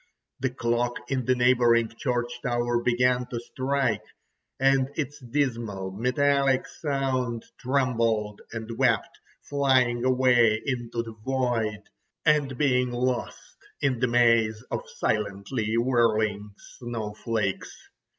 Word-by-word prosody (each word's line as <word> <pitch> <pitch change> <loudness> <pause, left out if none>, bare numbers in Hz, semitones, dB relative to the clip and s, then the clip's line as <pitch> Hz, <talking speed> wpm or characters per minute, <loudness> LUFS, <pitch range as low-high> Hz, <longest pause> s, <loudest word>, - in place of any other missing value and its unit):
The 130 - 0
clock 120 -1 -1
in 130 -3 0
the 130 - +3
neighbouring 120 -2 +3
church 120 -1 -2
tower 120 -1 0
began 125 +1 +2
to 120 - -4
strike, 130 -1 -1 0.6
and 135 0 +3
its 145 -1 -3
dismal 115 -7 -2
metallic 135 +5 +2
sound 130 -5 -2 0.2
trembled 115 -5 0
and 115 0 -6
wept, 125 -4 +1 0.2
flying 130 -4 +2
away 125 -4 +4
into 120 -3 -2
the 115 -1 -9
void, 120 -5 -1 0.4
and 145 -4 +2
being 125 -3 +2
lost 125 0 -3 0.2
in 130 -4 0
the 125 - +2
maze 115 -2 +3
of - - -1
silently 105 +2 -2
whirling 110 -4 +1 0.2
snowflakes. 110 -3 -3
120 Hz, 110 wpm, -26 LUFS, 115-130 Hz, 0.6 s, away